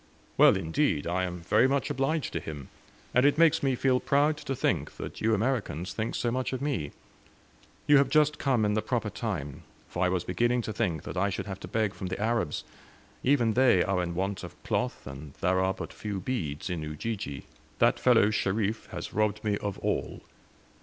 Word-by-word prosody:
"Well, -, -, +6 dB
indeed! 80 Hz, -, 0 dB
I 95 Hz, +2 st, 0 dB
am 90 Hz, -1 st, -6 dB
very 110 Hz, +9 st, +4 dB
much 135 Hz, 0 st, 0 dB
obliged 135 Hz, +4 st, -1 dB
to -, -, -1 dB
him; 75 Hz, -4 st, -8 dB, 0.4 s
and 125 Hz, -, +4 dB
it 145 Hz, +1 st, +4 dB
makes 165 Hz, -2 st, +5 dB
me 135 Hz, -2 st, +1 dB
feel 130 Hz, 0 st, +2 dB
proud 145 Hz, +4 st, +2 dB
to 135 Hz, -2 st, -4 dB
think -, -, 0 dB
that -, -, -8 dB
you 110 Hz, 0 st, +3 dB
Americans 105 Hz, -, -1 dB
think 110 Hz, +1 st, -3 dB
so 120 Hz, -, 0 dB
much 130 Hz, +2 st, -2 dB
of 130 Hz, -, -2 dB
me. 130 Hz, -, -2 dB, 0.9 s
You 145 Hz, -, +6 dB
have 140 Hz, -, +2 dB
just 150 Hz, -1 st, +3 dB
come 130 Hz, -7 st, +2 dB
in 105 Hz, -, +1 dB
the 110 Hz, -, +1 dB
proper -, -, -2 dB
time; 70 Hz, -1 st, -4 dB, 0.3 s
for 90 Hz, -, -2 dB
I 90 Hz, -, +3 dB
was 90 Hz, -1 st, 0 dB
beginning 120 Hz, +6 st, +1 dB
to 110 Hz, -, -4 dB
think 90 Hz, -9 st, -1 dB
that -, -, -6 dB
I 100 Hz, +2 st, +2 dB
should 95 Hz, -, -3 dB
have 95 Hz, -2 st, -6 dB
to -, -, -8 dB
beg 110 Hz, -3 st, 0 dB
from 95 Hz, 0 st, -5 dB
the 95 Hz, -, -4 dB
Arabs. 110 Hz, -7 st, 0 dB, 0.6 s
Even 125 Hz, -5 st, +3 dB
they 120 Hz, -7 st, +5 dB
are 95 Hz, -1 st, 0 dB
in 85 Hz, -1 st, -3 dB
want 95 Hz, +1 st, -2 dB
of -, -, -8 dB
cloth, -, -, -2 dB
and 70 Hz, +1 st, -9 dB
there 95 Hz, +1 st, +1 dB
are 95 Hz, 0 st, +2 dB
but -, -, -7 dB
few 105 Hz, -2 st, -4 dB
beads 90 Hz, -, -3 dB
in 85 Hz, -3 st, -2 dB
Ujiji. 75 Hz, 0 st, -4 dB, 0.3 s
That -, -, +3 dB
fellow 105 Hz, -, +5 dB
Sherif 105 Hz, +1 st, -1 dB
has -, -, -7 dB
robbed 105 Hz, 0 st, 0 dB
me 105 Hz, -1 st, +1 dB
of 100 Hz, -2 st, -3 dB
all. -, -, -2 dB
105 Hz, 205 wpm, -28 LUFS, 90-130 Hz, 0.9 s, Well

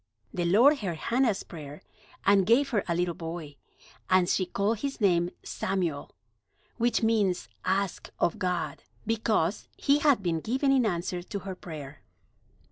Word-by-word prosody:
The 175 Hz, -, -1 dB
Lord 245 Hz, -, +5 dB
heard 180 Hz, -6 st, -3 dB
Hannah's 235 Hz, +1 st, +1 dB
prayer, 150 Hz, -3 st, -10 dB, 0.4 s
and 195 Hz, -2 st, +4 dB
gave 265 Hz, +5 st, +4 dB
her 210 Hz, -6 st, +1 dB
a 170 Hz, -, 0 dB
little 175 Hz, 0 st, 0 dB
boy, 165 Hz, -4 st, -7 dB, 0.5 s
and 185 Hz, -1 st, +4 dB
she 185 Hz, 0 st, +1 dB
called 205 Hz, +2 st, 0 dB
his 275 Hz, +1 st, -3 dB
name 175 Hz, -4 st, +3 dB
Samuel, 175 Hz, -7 st, -3 dB, 0.6 s
which 240 Hz, -1 st, +1 dB
means 210 Hz, -5 st, +1 dB, 0.2 s
"Asked 190 Hz, 0 st, -1 dB
of 170 Hz, -, 0 dB
God"; 175 Hz, -5 st, -2 dB, 0.2 s
because 220 Hz, -5 st, 0 dB
he 285 Hz, +1 st, +3 dB
had 285 Hz, -8 st, +3 dB
been 165 Hz, -2 st, 0 dB
given 265 Hz, -, +1 dB
in 260 Hz, -4 st, +4 dB
answer 175 Hz, -1 st, -2 dB
to 200 Hz, +3 st, -5 dB
her 190 Hz, 0 st, -5 dB
prayer. 150 Hz, -6 st, -9 dB
190 Hz, 150 wpm, -28 LUFS, 170-225 Hz, 0.6 s, Lord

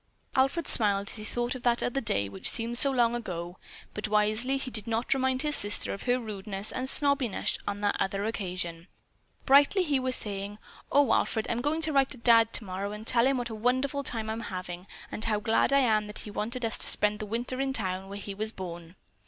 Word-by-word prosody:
Alfred 270 Hz, +5 st, +1 dB
smiled 200 Hz, -3 st, +1 dB
as -, -, -4 dB
he 215 Hz, -, -7 dB
thought 240 Hz, +3 st, -1 dB
of 255 Hz, -, -8 dB
that 240 Hz, -1 st, +2 dB
other 275 Hz, +3 st, -1 dB
day 100 Hz, -, +1 dB
which 95 Hz, -1 st, -2 dB
seemed 235 Hz, +1 st, +1 dB
so 275 Hz, +3 st, +4 dB
long 240 Hz, -3 st, +2 dB
ago, 180 Hz, -6 st, -5 dB, 0.3 s
but 210 Hz, -, -3 dB
wisely 215 Hz, +5 st, +1 dB
he 265 Hz, -1 st, -5 dB
did 215 Hz, -2 st, +2 dB
not 230 Hz, +3 st, 0 dB
remind 260 Hz, 0 st, 0 dB
his 300 Hz, -1 st, +2 dB
sister 205 Hz, 0 st, +1 dB
of 200 Hz, -, -7 dB
her 245 Hz, +1 st, +3 dB
rudeness 205 Hz, -2 st, -5 dB
and 260 Hz, +1 st, -1 dB
snobbishness 280 Hz, -7 st, +2 dB
on 205 Hz, 0 st, -3 dB
that 205 Hz, -1 st, +1 dB
other 195 Hz, +1 st, -1 dB
occasion. 180 Hz, -5 st, -4 dB, 0.6 s
Brightly 285 Hz, +8 st, +5 dB
she 285 Hz, -4 st, +1 dB
was 255 Hz, 0 st, +1 dB
saying, 200 Hz, 0 st, -1 dB, 0.3 s
"Oh, 285 Hz, -1 st, +4 dB
Alfred, 220 Hz, -1 st, +1 dB
I'm 235 Hz, 0 st, -1 dB
going 300 Hz, +4 st, 0 dB
to 315 Hz, -1 st, -1 dB
write 270 Hz, -3 st, +1 dB
Dad 230 Hz, -1 st, +5 dB
tomorrow 200 Hz, -1 st, -4 dB
and 210 Hz, +1 st, -8 dB
tell 235 Hz, +1 st, +3 dB
him 270 Hz, -1 st, +2 dB
what 240 Hz, -1 st, -3 dB
a -, -, -5 dB
wonderful 255 Hz, +5 st, 0 dB
time 225 Hz, -5 st, -3 dB
I'm 220 Hz, -, -4 dB
having 180 Hz, 0 st, -6 dB, 0.2 s
and 215 Hz, -, -3 dB
how 215 Hz, -2 st, +1 dB
glad 225 Hz, +4 st, +2 dB
I 275 Hz, 0 st, +5 dB
am 215 Hz, -4 st, +2 dB
that 210 Hz, -, -7 dB
he 210 Hz, -, -7 dB
wanted 230 Hz, +4 st, -3 dB
us 225 Hz, -, -2 dB
to -, -, +3 dB
spend 210 Hz, 0 st, +3 dB
the 215 Hz, -, -5 dB
winter 240 Hz, +4 st, -3 dB
in 270 Hz, -, 0 dB
the -, -, +2 dB
town 190 Hz, -2 st, -4 dB
where 200 Hz, -, -6 dB
he 200 Hz, 0 st, -6 dB
was 215 Hz, +2 st, -2 dB
born." 175 Hz, -3 st, -8 dB
225 Hz, 225 wpm, -28 LUFS, 200-255 Hz, 0.6 s, Brightly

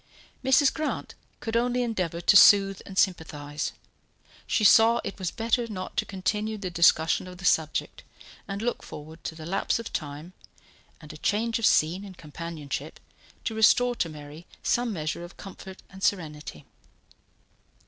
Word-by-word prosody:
Mrs. 265 Hz, +1 st, +4 dB
Grant 310 Hz, -1 st, -3 dB, 0.3 s
could 225 Hz, -1 st, -4 dB
only 245 Hz, +1 st, +1 dB
endeavour 180 Hz, -8 st, -2 dB
to 185 Hz, -, +4 dB
soothe 195 Hz, -2 st, +7 dB
and 190 Hz, -, -9 dB
sympathize. 150 Hz, -6 st, -1 dB, 0.8 s
She 215 Hz, -, +1 dB
saw 225 Hz, +3 st, +6 dB
it -, -, -6 dB
was 185 Hz, -3 st, -1 dB
better 230 Hz, +2 st, 0 dB
not 185 Hz, -4 st, -6 dB
to -, -, +1 dB
continue 210 Hz, +3 st, -2 dB
the 190 Hz, -3 st, -5 dB
discussion 165 Hz, 0 st, +3 dB
of 180 Hz, 0 st, -10 dB
the 180 Hz, -, -9 dB
subject, 160 Hz, -3 st, 0 dB, 0.5 s
and 200 Hz, +1 st, -4 dB
looked 240 Hz, -, -2 dB
forward 155 Hz, +2 st, -10 dB
to 160 Hz, -, -4 dB
the 160 Hz, -1 st, -9 dB
lapse 190 Hz, +4 st, 0 dB
of 230 Hz, 0 st, -7 dB
time, 150 Hz, +4 st, -5 dB, 0.7 s
and 150 Hz, -, -11 dB
a -, -, -10 dB
change 225 Hz, +7 st, 0 dB
of 225 Hz, -, +3 dB
scene 170 Hz, +6 st, +2 dB
and 190 Hz, -3 st, -11 dB
companionship, 155 Hz, -1 st, -6 dB, 0.4 s
to 225 Hz, -, -2 dB
restore 245 Hz, +3 st, +4 dB
to 165 Hz, -, 0 dB
Mary 150 Hz, +2 st, -11 dB, 0.2 s
some 240 Hz, -1 st, +1 dB
measure 155 Hz, -2 st, -3 dB
of 175 Hz, -, -11 dB
comfort 190 Hz, -1 st, -11 dB
and 190 Hz, 0 st, -12 dB
serenity. 150 Hz, -, -2 dB
185 Hz, 160 wpm, -27 LUFS, 160-220 Hz, 0.8 s, soothe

